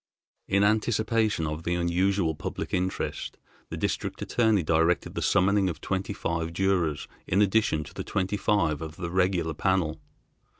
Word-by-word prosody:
In 100 +1 +3
anticipation 110 -2 +1
of 75 +1 -3
the 85 +1 -1
unusual 90 0 +1
public - - -5
interest 95 0 -2 0.3
the - - -5
District - - -2
Attorney 110 -6 +2
directed 80 0 +1
the - - -3
summoning 100 0 +3
of 85 - -5
twenty 95 +1 -2
five 85 -4 -3
jurors 90 -5 0 0.2
in 95 - +2
addition 105 -6 +2
to - - -13
the - - -5
twenty 95 +1 -1
five 90 -9 +1
of 80 -1 -6
the 85 -2 -5
regular 90 -3 +1
panel. 80 -2 0
95 Hz, 155 wpm, -27 LUFS, 80-100 Hz, 0.3 s, In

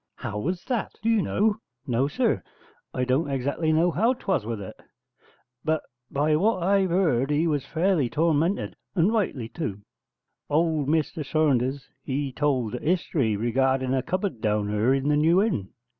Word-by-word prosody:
'How 105 0 -5
was 175 - -2
that, 245 -5 -2
do 225 - +2
you 225 -2 +3
know?' 210 +3 +1 0.3
'No, 130 0 +1
sir, 235 - 0 0.5
I 125 - -1
don't 130 +5 +1
exactly 140 +4 0
know 165 +3 +3
how 225 +9 +2
'twas 190 - -1
with 115 -2 -3
it: 95 - -8 0.9
but 155 -1 0 0.3
by 150 +2 +1
what 195 +1 +1
I've 190 -1 +2
'eard 155 -8 +2
he 150 +3 +2
was 150 -5 -1
fairly 165 -6 +1
tormented; 165 +5 +1 0.2
and 185 +5 +3
rightly 160 - -1
tu. 115 - -5 0.7
Old 155 -1 +1
Mr 155 0 0
Saunders, 135 -2 +1
he 140 0 -2
told 130 -5 0
a 125 - -3
history 150 - 0
regarding 130 +3 +1
a 130 - +2
cupboard 185 - -3
down 105 -1 0
yurr 105 +4 +2
in 135 +1 -2
the 150 0 +3
New 165 +4 +4
Inn. 175 - 0
150 Hz, 165 wpm, -25 LUFS, 130-175 Hz, 0.9 s, New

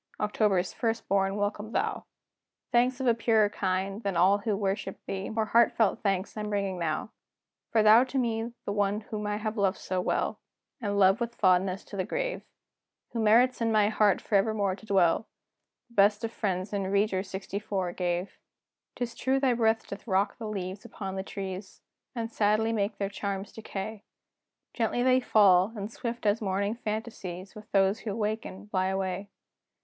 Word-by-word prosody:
October's 205 -3 +1
first 230 -1 -2
born, 195 0 +1
welcome 205 +1 -2
thou! 435 +1 -1 0.7
Thanks 250 +2 +3
of 265 - -2
a 240 - +5
purer 225 -2 +3
kind, 195 +1 -2
than 200 -5 -2
all 190 +4 +5
who 210 -1 -1
worship 195 -1 -2
thee, 195 0 -4
More 220 0 0
heartfelt 225 -1 +3
thanks 195 -1 -1
I'm 210 -1 -3
bringing 200 -3 -1
now! 165 +6 -2 0.6
For 220 -2 +4
thou 220 +3 +8
to 265 +1 -4
me 230 -2 0
the - - -2
one 205 +1 0
whom 210 -1 -5
I 210 - -1
have 215 +1 -3
loved 200 -1 +2
so 185 0 -2
well, - - -1 0.4
And 205 -2 -1
love 195 +3 +5
with 235 0 -2
fondness 185 0 +2
to 200 - -9
the 185 - +1
grave, - - -2 0.7
Who 235 - -3
merits 240 +4 +4
in 225 -1 +2
my 210 -1 +4
heart 210 -2 +3
forevermore 200 -2 +1
to 220 - -16
dwell, 190 0 +3 0.6
The - - -22
best 205 +1 +4
of 225 - -2
friends 190 -3 -2
in 200 -1 -1
Rieger 195 -1 -1
gave. 175 +1 -2 0.6
'Tis 240 -1 -3
true 265 +3 +1
thy 265 -2 +3
breath 225 -1 +2
doth 200 +4 -9
rock 195 0 +1
the 225 - -5
leaves 195 -2 -5
upon 195 -2 -6
the 190 - -2
trees, 190 0 -7 0.3
And 230 -1 -3
sadly 215 +1 +2
make 205 -1 -1
their 200 - -1
charms 200 -1 -4
decay; 215 -1 -6 0.7
Gently 240 +1 0
they 255 0 +5
fall: 200 -5 +5
and 205 +1 -5
swift, 235 -1 -5
as 210 +2 +2
morning 200 +1 0
phantasies 210 -5 -5
With 215 0 -13
those 195 +2 +3
who 210 -3 -4
waken, 215 -2 -3
fly 185 -2 +1
away. 190 +1 -2
205 Hz, 175 wpm, -28 LUFS, 195-225 Hz, 0.7 s, thou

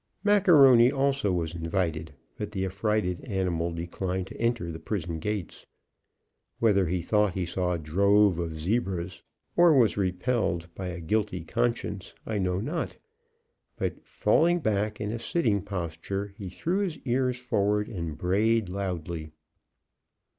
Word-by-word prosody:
Macaroni 145 - +6
also 140 -6 +1
was 85 -2 -1
invited, 85 -1 -2 0.2
but 105 0 -5
the 95 -2 -1
affrighted 95 -1 -1
animal 90 -6 -1
declined 90 +2 -3
to - - -10
enter 115 -8 0
the 80 - -7
prison 85 -2 -3
gates. 105 0 -4 0.9
Whether 100 -5 +3
he 90 0 -1
thought 105 0 +2
he 95 -2 -1
saw 90 +1 -1
a - - -1
drove 100 +4 +3
of 80 -2 -3
zebras, 95 0 -2 0.3
or 170 -3 +6
was 115 -5 +4
repelled 90 -3 -1
by 95 +1 -5
a 90 -1 -5
guilty 90 0 -1
conscience, 115 0 -2
I 110 -2 -2
know 90 -1 0
not, 150 - -3 0.8
but, - - -3
falling 175 +2 +2
back 105 -5 -1
in 105 0 -2
a 115 - -3
sitting 115 - +1
posture, 95 +1 -4
he 100 -2 -7
threw 175 - -1
his 185 -6 -1
ears 125 0 +1
forward 105 -4 0
and 85 -6 -5
brayed 105 +3 +1
loudly. 90 -4 -4
100 Hz, 140 wpm, -27 LUFS, 85-115 Hz, 0.9 s, Macaroni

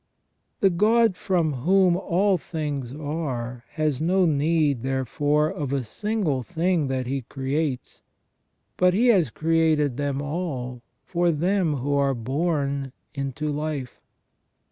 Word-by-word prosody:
The 195 - +5
God 220 +3 +3
from 170 -5 0
whom 180 +7 +3
all 190 +1 +1
things 145 -7 -4
are 135 -5 -4
has 155 -4 0
no 185 +3 +3
need, 150 -3 +2
therefore, 145 +4 0
of 145 -3 -4
a 140 -2 0
single 190 - -1
thing 170 +1 0
that 130 -1 -2
He 135 +2 -2
creates, 135 +2 -3 0.8
but 180 0 +4
He 240 +4 +4
has 185 - +4
created 155 -2 +1
them 140 -1 -1
all 140 -5 -4 0.2
for 175 -1 +1
them 175 0 +1
who 140 +2 -2
are 140 -1 +2
born 140 +1 -1 0.2
into 140 +2 -3
life. 145 -3 -4
150 Hz, 125 wpm, -24 LUFS, 135-175 Hz, 0.8 s, The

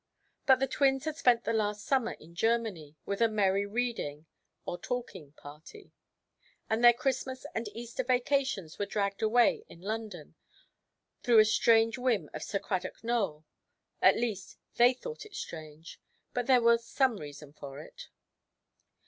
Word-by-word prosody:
But 265 -1 +6
the 270 - +2
twins 270 +1 +1
had 315 -1 -2
spent 240 -5 +3
the 230 - -1
last 210 -2 -1
summer 260 -4 +1
in 165 +2 -16
Germany, 200 -7 -1
with 200 +2 -3
a 230 - +6
merry 200 -2 +1
reading 205 -10 -3 0.4
(or 175 - -4
talking) 190 - -5
party; 155 - -13 0.8
and 220 +2 0
their 240 - +10
Christmas 260 +1 -3
and 225 0 -3
Easter 235 +4 -5
vacations 250 - 0
were 205 - -1
dragged 200 -1 -2
away 230 +2 +3
in 170 - -14
London, 205 -5 -6 0.9
through 240 -3 +4
a 215 - +8
strange 225 +2 +3
whim 230 - 0
of 155 - -6
Sir 200 - -2
Cradock 185 0 -4
Nowell; 200 -10 -1 0.6
at - - +6
least, 225 -5 -3 0.2
they 245 +2 +5
thought 465 - -8
it 425 -1 -13
strange, 155 0 -9 0.3
but 245 -1 -2
there 255 -3 +5
was 235 0 +4
some 260 -1 +1
reason 145 -2 -10
for 140 -2 -9
it. 155 - -11
225 Hz, 155 wpm, -30 LUFS, 180-245 Hz, 0.9 s, their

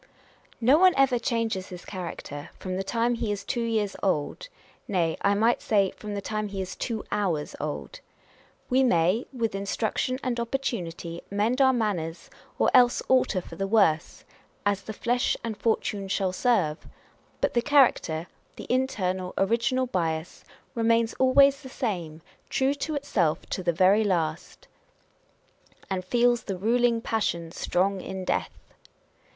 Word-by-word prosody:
No 255 +6 +5
one 370 0 +6
ever 270 -3 +4
changes 230 -6 -1
his 180 -1 -9
character 170 -5 -7
from 185 -1 -4
the 190 - -2
time 230 +4 0
he 230 -2 -2
is 200 -1 -3
two 240 +3 -2
years 220 -3 -1
old; 185 - -1 0.4
nay, 170 -5 +1
I 200 0 +3
might 225 +3 +2
say, 200 -3 +2
from 210 -1 -7
the 200 - -3
time 215 0 -2
he 200 -1 -6
is 190 -1 -4
two 225 -3 -3
hours 170 -8 -1
old. 150 0 -5 0.7
We 260 +1 +3
may, 185 0 +2
with 230 -5 -2
instruction 210 +5 -1
and 245 -2 -1
opportunity, 190 -10 -3
mend 220 +6 +1
our 265 -1 +6
manners, 195 -9 -2 0.3
or - - +3
else 245 -1 +5
alter 255 -7 +3
for 165 - -11
the 195 - -1
worse, 195 -7 +2
â€" - - -28
" - - -37
as 200 0 -3
the 220 - -7
flesh 245 +3 0
and 230 -2 -3
fortune 205 -2 -1
shall 190 -1 0
serve 185 -9 +1 0.3
;" - - -35
but - - 0
the 240 - +2
character, 245 - +3 0.3
the - - -8
internal, 190 -8 -1
original 235 +6 +1
bias, 165 -7 -3 0.3
remains 230 0 +2
always 275 +2 +5
the 265 - -10
same, 175 - -4 0.3
true 265 +1 +1
to 300 +2 -3
itself 185 - 0
to - - -2
the 175 -1 +1
very 190 +6 +4
last 170 -5 -2 1.1
â€" - - -22
And 185 -1 -1
feels 240 +4 +2
the 195 -3 -3
ruling 235 +3 +2
passion 170 -8 -1
strong 190 +2 0
in 190 0 -6
death - - -2
210 Hz, 160 wpm, -26 LUFS, 185-240 Hz, 1.1 s, one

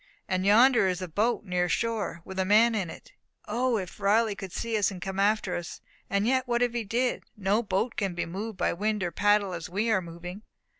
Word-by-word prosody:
"And 185 0 0
yonder 235 0 +6
is 180 -1 -1
a - - -4
boat, 215 +7 0
near 180 -2 0
shore, 220 -6 -1
with 190 0 -6
a - - +3
man 215 +4 +5
in 195 -6 -1
it. - - -12 0.3
O, 240 +2 +1
if 185 -1 -6
Riley 210 +2 +3
could 195 -2 -8
see 230 +4 -3
us, 205 -2 +2
and 190 - -7
come 190 +1 -4
after 205 -2 +1
us! 175 0 -6 0.3
And 200 +1 +1
yet 260 +1 +1
what 240 0 +2
if 245 -1 0
he 235 -1 -1
did! 240 +5 -1
No 205 +2 +1
boat 215 +2 -1
can 195 -4 -1
be 175 - -2
moved 200 +5 -5
by - - +1
wind 210 +2 -1
or 175 - -1
paddle 205 +1 +2
as 170 -2 -6
we 215 +5 0
are 190 - +3
moving." 175 +3 -8
205 Hz, 230 wpm, -28 LUFS, 185-225 Hz, 0.3 s, yonder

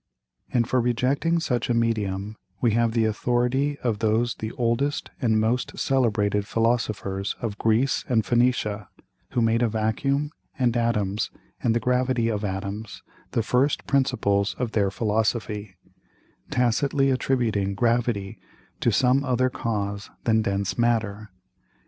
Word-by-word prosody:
And 120 -2 +2
for 130 0 +2
rejecting 135 +8 +1
such 125 -8 -1
a 120 - +2
Medium, 105 -3 -1 0.2
we 120 0 +2
have 115 +1 +2
the 115 -1 +2
Authority 125 +6 0
of 115 -4 0
those 115 +2 +1
the 110 0 -5
oldest 125 +4 -1
and 110 -4 +3
most 115 +3 0
celebrated 105 -6 +1
Philosophers 110 -4 0
of 105 -3 -4
Greece 115 +4 +2
and 115 -4 +2
Phoenicia, 120 -4 +1 0.4
who 120 - +2
made 115 +1 +2
a 120 - +3
Vacuum, 135 +7 0 0.3
and 125 -3 +1
Atoms, 105 -4 0 0.3
and 115 -1 +2
the - - +3
Gravity 125 -1 +1
of 105 -2 -2
Atoms, 100 0 -5 0.3
the 115 - +1
first 130 +6 +1
Principles 105 -8 +1
of 125 -3 -2
their 100 -3 +2
Philosophy; 105 -1 -1 0.7
tacitly 135 +3 +2
attributing 115 -7 0
Gravity 115 -3 0 0.4
to 120 - +2
some 130 +5 +3
other 130 -1 +1
Cause 100 -3 -3
than 110 -1 +3
dense 100 0 -2
Matter. 110 -3 0
115 Hz, 135 wpm, -25 LUFS, 105-125 Hz, 0.7 s, and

